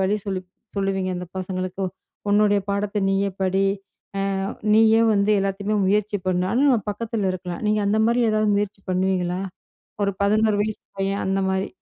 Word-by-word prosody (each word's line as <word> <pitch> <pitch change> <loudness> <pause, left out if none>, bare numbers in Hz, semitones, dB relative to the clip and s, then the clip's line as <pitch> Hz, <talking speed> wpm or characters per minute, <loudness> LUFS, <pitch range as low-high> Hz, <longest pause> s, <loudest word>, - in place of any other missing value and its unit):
வழி 195 +2 +2
சொல்லி 195 -2 -2 0.4
சொல்லுவீங்க 195 -1 0
அந்த 180 0 -5
பசங்களுக்கு. 185 0 -3 0.5
உன்னுடைய 205 0 +4
பாடத்த 200 +1 -1
நீயே 195 +1 +1
படி! 190 +1 +2 0.8
அ - - -1 0.3
நீயே 225 0 +6
வந்து 200 +1 +2
எல்லாத்தையுமே 195 +2 -1
முயற்சி 210 +1 +1
பண்ணு! 180 -1 +1
ஆனா 235 +5 +1
நம்ம 245 -5 +4
பக்கத்தில 210 -2 -2
இருக்கலாம். 180 -1 -6
நீங்க 210 0 +2
அந்தமாரி 220 +4 +3
ஏதாவது 215 0 +2
முயற்சி 205 -1 -2
பண்ணுவீங்களா? 185 -1 0 0.6
ஒரு 200 - +1
11 215 0 +3
வயசு 215 0 -4 0.2
பையன் 195 +1 -1
அந்தமாரி. 190 0 0
200 Hz, 145 wpm, -23 LUFS, 190-210 Hz, 0.8 s, நீயே